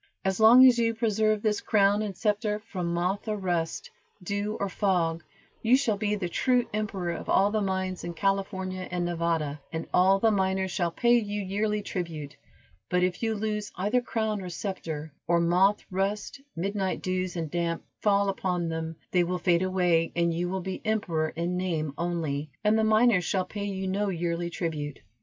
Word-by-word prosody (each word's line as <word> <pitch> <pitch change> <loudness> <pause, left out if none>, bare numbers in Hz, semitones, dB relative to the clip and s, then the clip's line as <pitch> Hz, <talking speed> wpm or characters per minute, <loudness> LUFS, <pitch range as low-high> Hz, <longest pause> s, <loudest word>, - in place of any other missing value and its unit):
"As 190 +1 0
long 235 +4 +9
as 245 -2 +6
you 230 -1 +1
preserve 215 -2 +1
this 210 -2 +1
crown 205 0 +3
and 200 -4 -4
scepter 210 0 0
from 190 -5 -4
moth 180 +5 -1
or 215 -1 -1
rust, 175 -4 -2 0.3
dew 205 +3 -2
or 200 - 0
fog, 175 -4 0 0.4
you 240 +3 +5
shall 235 -6 +1
be 210 +1 0
the 190 -4 -2
true 245 +7 +2
emperor 200 -5 -2
of - - -6
all 200 +2 +4
the 215 0 0
mines 190 -1 -2
in 170 0 -5
California 190 0 -1
and 175 -1 -1
Nevada, 165 -4 -1
and 165 0 -3
all 190 +2 +5
the 225 +2 +4
miners 190 -1 0
shall 175 -2 0
pay 240 +7 +3
you 205 -2 -3
yearly 210 +2 -1
tribute, 165 -7 -5 0.5
but 180 0 +2
if 180 -1 0
you 225 -1 0
lose 210 -1 -3
either 210 +7 +1
crown 220 -3 -2
or 180 - -6
scepter, 165 -5 -5
or 170 0 +3
moth, 180 +4 +3
rust, 200 +7 -2
midnight 190 +2 -2
dews 185 -1 -2
and 165 -3 -3
damps 170 -1 -2 0.2
fall 200 -1 +3
upon 180 -3 -1
them, 160 0 -4 0.2
they 180 -1 +3
will 180 +1 -1
fade 175 -1 +2
away, 180 -3 +2
and 170 -1 +2
you 175 +2 -1
will 190 0 -2
be 190 +1 -5
emperor 180 -8 0
in 170 +3 -2
name 165 -5 -2
only, 160 -4 -2
and 210 +1 +4
the 220 - +2
miners 220 -3 +4
shall 185 +2 0
pay 205 -1 -5
you 190 -1 -3
no 200 +2 0
yearly 170 -1 -2
tribute." 150 -4 -4
190 Hz, 185 wpm, -27 LUFS, 170-210 Hz, 0.5 s, long